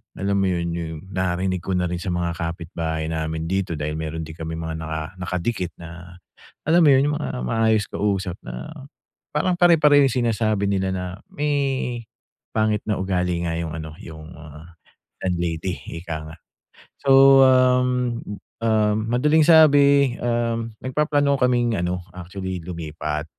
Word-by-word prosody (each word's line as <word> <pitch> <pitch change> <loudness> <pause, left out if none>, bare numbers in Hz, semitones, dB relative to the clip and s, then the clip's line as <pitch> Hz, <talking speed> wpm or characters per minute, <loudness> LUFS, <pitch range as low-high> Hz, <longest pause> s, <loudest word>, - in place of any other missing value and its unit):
alam 100 +1 -1
mo - - +2
yun, 85 -2 -1
yung 80 -2 -5
narinig 95 -1 -1
ko 95 - -4
na 90 0 0
rin 85 0 -3
sa 90 0 -3
mga 85 -1 -1
kapitbahay 80 -1 -4
namin 80 0 -3
dito 95 -3 -1
dahil 75 +1 -3
meron 80 0 -4
di 80 - -9
kami 80 0 -5
mga 80 -1 -4
naka 80 -1 -4 0.2
nakadikit 90 +1 -2
na 85 +1 -11 0.5
alam 170 +2 +5
mo 150 - +6
yun, 135 +2 +4
yung - - -1
mga - - -3 0.2
maayos 110 - +2
kausap 95 -3 -2
na - - -7 0.6
parang 175 +4 +1
pare-pareho 155 -5 +5
yung - - -1
sinasabi 110 -4 0
nila 95 -1 0
na 90 -1 -3 0.3
may 150 0 -1 1.0
pangit 110 -1 0
na 105 -3 -2
ugali 90 -2 -1
nga 80 - -2
yung 80 -2 -4
ano, 80 -1 -7
yung, 80 0 -10
ah, 80 +2 -13 0.5
landlady, 85 0 -2 0.2
ika 80 -2 -5
nga. - - -13 0.7
So, 135 0 +7
um, 125 -1 +3 0.5
um, 110 -2 +2
madaling 150 +6 +3
sabi, 140 -5 +6
um, 115 -1 -1
nagpaplano 145 +1 +1
kaming 120 -2 +2
ano, 90 +1 -2
actually, 90 0 -6
lumipat. 80 -3 -4
95 Hz, 150 wpm, -22 LUFS, 85-125 Hz, 1.0 s, So